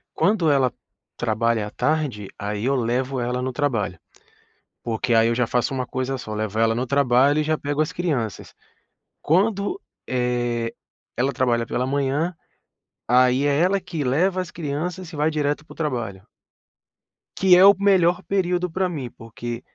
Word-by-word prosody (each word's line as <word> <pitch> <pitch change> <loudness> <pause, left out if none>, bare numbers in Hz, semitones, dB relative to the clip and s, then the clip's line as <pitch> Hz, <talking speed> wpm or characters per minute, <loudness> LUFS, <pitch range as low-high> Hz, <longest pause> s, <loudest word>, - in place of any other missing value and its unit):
Quando 190 -6 +2
ela 135 -4 +3 0.5
trabalha 115 -1 0
à - - -7
tarde, 125 -7 -1
aí 105 +1 -3
eu 135 - +2
levo 125 +2 -1
ela 125 +1 -1
no 130 +1 -2
trabalho, 120 - -1 0.8
porque 115 +1 -2
aí 115 0 +5
eu 115 - +1
já 125 - +1
faço 125 +2 0
uma 130 -1 -1
coisa 130 +1 -2
só, 110 -4 -7
levo 110 -1 -3
ela 115 0 +3
no 125 +3 -2
trabalho 140 +2 +3
e - - +2
já 155 0 0
pego 145 +1 -2
as 155 - -2
crianças. 145 - -3 0.7
Quando, 200 - +1 0.3
eh, 120 -2 -1 0.4
ela 135 +3 +1
trabalha 120 -2 +1
pela 125 +2 -2
manhã, 140 +5 0 0.7
aí 125 +2 +4
é 145 -1 +2
ela 190 +3 +2
que 165 -5 -4
leva 180 +9 +1
as 180 -4 -6
crianças 165 +3 -4
e 155 - -7
vai 150 +1 +2
direto 150 0 -1
para - - -13
o - - -15
trabalho. 120 - -3 1.1
Que 185 -2 +6
é 185 - +8
o 200 +1 +8
melhor 185 -2 +3
período 180 -2 0
pra 185 +2 0
mim, 140 -9 -5
porque 115 +1 -7
135 Hz, 165 wpm, -23 LUFS, 120-165 Hz, 1.1 s, é